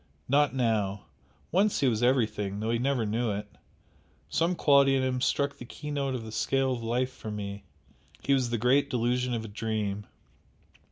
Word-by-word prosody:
not 145 +2 +3
now! 105 -5 0 0.5
Once 200 +4 +2
he 135 - +4
was 115 -2 +1
everything, 110 -5 +1
though 110 +2 -1
he 115 - +1
never 130 -2 +1
knew 115 +3 0
it. 105 0 -3 0.8
Some 165 - +1
quality 140 -3 +5
in 130 - +1
him 130 -1 -1
struck 140 +1 0
the - - -7
keynote 140 +1 -3
of 120 - -4
the 110 - -8
scale 135 +4 +1
of 120 - -4
life 125 +3 -1
for 110 - -8
me, 100 -1 -5 0.6
he 140 - +2
was 130 -3 +2
the 120 - 0
great 135 +5 +3
delusion 125 +1 0
of 110 -1 -4
a - - -6
dream! 105 -1 -3
120 Hz, 180 wpm, -28 LUFS, 110-135 Hz, 0.8 s, quality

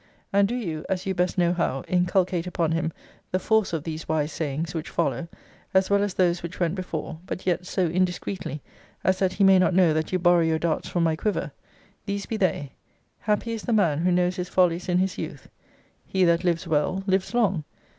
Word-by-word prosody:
And 200 0 +4
do 240 - -2
you 165 -11 -3
(as 185 -1 -1
you 190 - 0
best 180 0 0
know 175 -1 +3
how) 150 -6 -1
inculcate 180 -1 +1
upon 170 -3 0
him 165 0 0 0.4
the 185 - +2
force 220 +2 +2
of 165 -3 -2
these 160 0 -5
wise 155 -1 0
sayings 160 +3 -3
which 160 -2 -4
follow, 170 - -1 0.5
as 190 +1 +3
well 200 0 +4
as 205 -2 -1
those 175 -1 +2
which 170 +1 -7
went 170 -2 +1
before; 165 -4 -5
but 185 - -5
yet 180 0 0
so 185 -1 0
indiscreetly, 180 -3 -2 0.4
as 185 0 +2
that 185 -1 +1
he 195 - +1
may 190 -1 +7
not 185 -1 +3
know 180 -4 +5
that 155 0 -1
you 185 - +2
borrow 175 -1 +4
your 160 -1 +2
darts 160 0 -1
from 175 - 0
my 160 -1 +2
quiver. 210 +6 -2 0.6
These 200 0 -2
be 225 - -3
they 160 -8 0 0.5
Happy 215 +2 -1
is 225 - -4
the 235 - -1
man 165 -9 +3
who 180 +2 +2
knows 180 +1 +1
his 180 0 -3
follies 180 -1 +2
in 180 - +3
his 185 +1 0
youth. - - -6 0.6
He 190 -1 +1
that 170 0 +3
lives 175 0 0
well, 165 +4 0
lives 190 +3 0
long. 195 -9 +2
180 Hz, 215 wpm, -25 LUFS, 165-190 Hz, 0.6 s, may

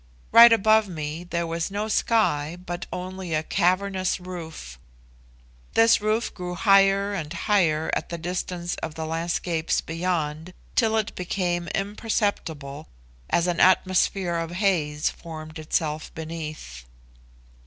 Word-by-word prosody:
Right 235 0 +10
above 220 -1 +4
me 155 0 -5
there 170 -1 -2
was 165 +1 -2
no 205 +2 -3
sky, 175 -8 +1
but 175 0 -5
only 180 -2 -4
a 155 - 0
cavernous 185 +2 +1
roof. 160 - -8 1.0
This 225 -1 +5
roof 215 +2 0
grew 180 -1 -5
higher 195 +1 +4
and 160 -6 -4
higher 170 -4 +1
at - - -1
the 170 - -4
distance 175 0 -3
of 160 -1 -5
the 160 -1 -4
landscapes 165 0 -1
beyond, 165 0 -3 0.2
till 225 -1 +2
it 215 -2 -1
became 175 -1 -2
imperceptible, 195 -8 -2 0.4
as 170 - +2
an 175 -2 -1
atmosphere 185 -1 +3
of 165 -1 -3
haze 165 -6 +1
formed 155 -1 -9
itself 155 0 -2
beneath. 155 - -7
175 Hz, 125 wpm, -25 LUFS, 160-195 Hz, 1.0 s, Right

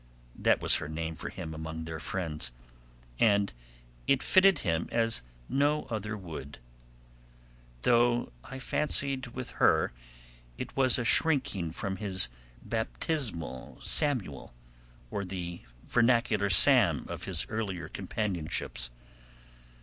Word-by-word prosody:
That - - +1
was - - +8
her 75 - -6
name 80 +1 -4
for 80 - -5
him 80 -4 -8
among 80 +1 -7
their 80 -1 -6
friends, 80 -7 -3 0.7
and 100 - +2 0.5
it 140 -1 +2
fitted 190 -2 +5
him 85 -1 -1
as 115 - +2 0.3
no 145 +2 0
other 105 -1 -4
would, 80 -7 -9 1.3
though 120 0 +2
I 135 - -9
fancied 135 -1 0
with 125 +1 -7
her - - +3 0.6
it - - -7
was 130 -3 +4
a 120 - -2
shrinking 130 - +2
from 95 +3 -4
his 95 - +2 0.3
baptismal 110 - -3
Samuel, 110 - +2 0.6
or 100 - -3
the 90 -2 -6 0.3
vernacular 115 -4 +2
Sam 90 - +7
of - - -7
his 90 -2 0
earlier 95 -6 -4
companionships. 90 - -2
100 Hz, 115 wpm, -29 LUFS, 80-120 Hz, 1.3 s, was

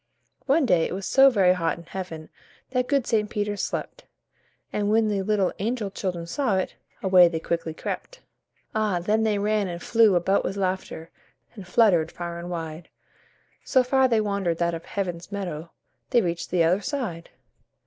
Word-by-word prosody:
One 285 +2 +3
day 175 -8 +3
it - - -4
was 195 - -5
so 270 0 +6
very 195 -7 +4
hot 165 -3 -1
in 170 - -11
Heaven 170 -3 -7 0.4
That 250 -1 0
good 275 -4 +1
St. 210 -3 +1
Peter 210 -2 -2
slept, - - -4 0.7
And 205 0 0
when 220 0 +3
the 200 -2 0
little 200 -1 +1
angel 215 0 -2
children 180 -4 -4
saw 210 +3 0
it, 185 - -2 0.3
Away 185 -2 +7
they 165 -1 -2
quickly 165 -1 -3
crept. - - -6 0.5
Ah! 215 -4 +1
then 210 +5 +1
they 215 -2 +1
ran 210 0 +1
and 170 -1 -5
flew 225 0 +4
about 190 +3 +2
with 195 - -3
laughter, 185 -3 -3 0.4
And 200 -5 -10
fluttered 180 -5 +3
far 170 -1 -6
and 175 +1 -7
wide, 165 -1 -6 0.7
So 260 -2 +3
far 265 +1 +3
they 230 -3 +2
wandered 200 -5 -1
that 170 0 0
of 165 0 -6
Heaven's 180 -2 -4
meadow 175 -5 -5 0.4
They 240 -3 +3
reached 170 -1 -3
the 175 -2 +2
other 180 +5 +2
side. 210 - -4
195 Hz, 180 wpm, -25 LUFS, 170-215 Hz, 0.7 s, Away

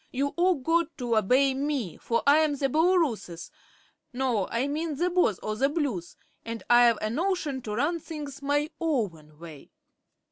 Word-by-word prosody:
You've 280 +2 -1
all 360 +1 +3
got 330 +4 +1
to 240 -4 -1
obey 255 +6 +3
me, 270 - -2
for 230 0 -1
I'm 295 +1 +4
the 275 -1 -1
Booloorooess 305 - 0 0.6
no, 245 -6 0
I 235 +4 -1
mean 305 +2 -2
the 350 +5 0
Boss 345 - +2
o' 215 - -2
the 270 +6 +1
Blues, 270 - -3 0.3
and 230 0 -6
I've 240 -2 +6
a 215 - 0
notion 315 -2 -1
to 210 -3 -5
run 305 +8 0
things 295 -3 -8
my 290 +2 0
own 195 - -2
way." 160 -3 -12
275 Hz, 165 wpm, -27 LUFS, 230-310 Hz, 0.6 s, I've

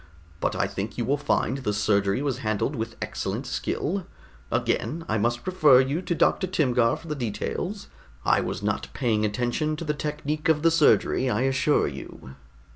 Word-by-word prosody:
But - - -1
I - - +1
think 100 +3 -5
you 120 - -1
will 135 +4 +2
find 135 -2 0
the 105 -6 -1
surgery 100 +3 +1
was 135 -3 -1
handled 110 +4 -1
with 115 -1 -4
excellent - - -3
skill. 185 +4 -2 0.4
Again, 165 +2 -1
I 110 - 0
must 120 +3 0
refer 155 -8 +6
you 135 +6 +1
to 175 -2 -2
Dr. 180 +3 +2
Timgar 125 -10 +2
for 165 - -13
the 155 - -2
details. 150 - -4 0.4
I - - +4
was - - -4
not - - -1
paying 110 -4 +1
attention 120 +8 -1
to 165 - -6
the 150 - 0
technique 150 +1 -3
of 155 -1 +3
the 165 - +5
surgery, 150 -4 +3
I 115 0 0
assure 135 +3 +2
you." 65 - -9
135 Hz, 180 wpm, -26 LUFS, 115-155 Hz, 0.4 s, refer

